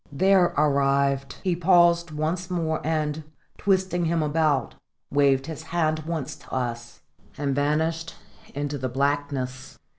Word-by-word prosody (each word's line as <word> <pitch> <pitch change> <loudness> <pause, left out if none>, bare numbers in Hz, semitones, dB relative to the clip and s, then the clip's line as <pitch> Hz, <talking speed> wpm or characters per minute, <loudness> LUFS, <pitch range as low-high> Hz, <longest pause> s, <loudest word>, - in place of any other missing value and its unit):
There 190 +5 +4
arrived, 140 -1 +2
he 180 -2 +1
paused 175 -1 +4
once 160 +4 -2
more, 160 -3 -1
and, 155 -1 -1 0.4
twisting 185 -3 +1
him 165 -1 +1
about, 150 -4 +1 0.4
waved 140 -2 +3
his 160 0 -6
hand 160 -2 0
once 160 -6 -3
to - - -18
us 120 -2 -4 0.4
and 140 -1 -1
vanished 160 +4 0 0.4
into 145 0 -3
the 130 0 -2
blackness. 135 -1 -2
150 Hz, 125 wpm, -25 LUFS, 140-170 Hz, 0.4 s, There